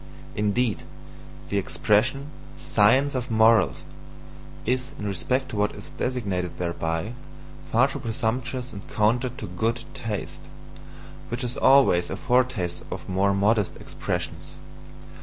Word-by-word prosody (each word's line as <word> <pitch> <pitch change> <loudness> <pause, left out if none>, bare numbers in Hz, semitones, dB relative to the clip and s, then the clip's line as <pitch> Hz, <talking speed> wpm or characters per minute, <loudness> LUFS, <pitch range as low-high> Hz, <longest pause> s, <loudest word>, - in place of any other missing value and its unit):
Indeed, 105 -3 +1 0.7
the 100 - +1
expression, 130 +9 +1 0.3
"Science 105 - +3
of 125 -2 -2
Morals" 110 -2 +4 0.8
is, 130 +3 -1
in 105 - -5
respect 125 +7 -1
to - - -6
what 105 0 +1
is 145 - -9
designated 100 -10 -2
thereby, 85 +3 -2 0.6
far 125 +4 +5
too 135 - -5
presumptuous 125 +3 -2
and 100 - -7
counter 120 +4 +2
to 120 -3 -7
GOOD 110 +6 -1
taste, 115 -6 -5 0.9
which 120 +2 -3
is 125 0 -2
always 130 -11 +5
a 95 - -3
foretaste 125 -9 +1
of - - -6
more 95 +1 +2
modest 105 0 +2
expressions. - - -5
110 Hz, 120 wpm, -25 LUFS, 100-125 Hz, 0.9 s, far